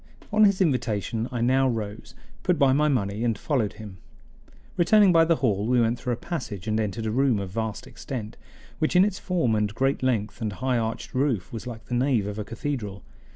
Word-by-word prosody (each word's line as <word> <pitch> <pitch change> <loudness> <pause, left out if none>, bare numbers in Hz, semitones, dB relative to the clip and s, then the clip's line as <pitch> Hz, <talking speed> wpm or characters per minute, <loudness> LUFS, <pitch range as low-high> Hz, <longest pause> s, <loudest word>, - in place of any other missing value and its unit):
On 215 0 +6
his 200 -1 +3
invitation 115 - 0
I 120 -2 -3
now 130 +2 +3
rose, 110 -2 -5 0.3
put 180 -2 +1
by 140 -3 +4
my 150 +2 +3
money, 110 -6 0
and 115 -3 0
followed 115 -5 -1
him. 105 -4 -10 0.8
Returning 200 +2 +5
by 165 -1 +5
the 165 0 +3
hall 105 -7 0
we 125 0 +3
went 115 +1 +1
through 125 +1 -2
a - - -4
passage 115 - -5
and 110 0 +1
entered 110 +1 -2
a 110 - -1
room 130 -1 +2
of 100 -2 -4
vast 110 +1 -3
extent, 110 -5 -7 0.4
which 155 - 0
in 180 +2 +7
its 205 -3 -2
form 170 -11 0
and 105 -1 +1
great 135 +2 +1
length 120 -3 -1
and 110 -2 -2
high 130 +3 0
arched 110 0 -4
roof 130 -8 0
was 115 +2 -6
like 115 -2 -8
the - - -6
nave 125 -4 +2
of 105 +1 -5
a - - -2
cathedral. 110 -3 -5
120 Hz, 210 wpm, -25 LUFS, 110-140 Hz, 0.8 s, in